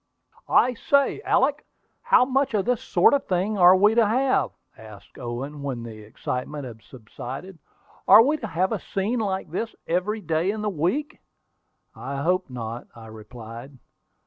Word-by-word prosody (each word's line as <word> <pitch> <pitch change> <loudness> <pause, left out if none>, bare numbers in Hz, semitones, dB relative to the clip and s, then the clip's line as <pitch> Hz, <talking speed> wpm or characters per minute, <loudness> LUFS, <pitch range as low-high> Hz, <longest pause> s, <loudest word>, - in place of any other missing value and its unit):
"I 250 - +4
say, 280 +3 +1
Alick, 285 +3 +2 0.4
how 475 - +4
much 270 0 0
more 210 - +2
of - - -10
this 245 -1 0
sort 175 - +3
of 285 - 0
thing 190 +4 0
are 180 +1 +8
we 205 +3 +4
to 230 -2 +4
have," 260 +5 +1 0.3
asked 110 -2 -14
Owen, 135 +4 -6
when 130 -4 -4
the 110 -2 -9
excitement 125 +6 -5
had 115 -3 -10
subsided. 130 - -9 0.5
"Are 225 - +9
we 295 +5 +1
to 230 - -6
have 185 0 -1
a - - -1
scene 210 +5 -2
like 190 -6 -3
this 225 +6 -4
every 195 +6 -1
day 165 +1 0
in 210 +1 -3
the 210 - -1
week?" 190 - -2 0.8
"I 140 0 -5
hope 180 0 0
not," 120 -1 -6
I 115 -1 -12
replied. 115 +4 -11
180 Hz, 170 wpm, -24 LUFS, -, 0.8 s, Are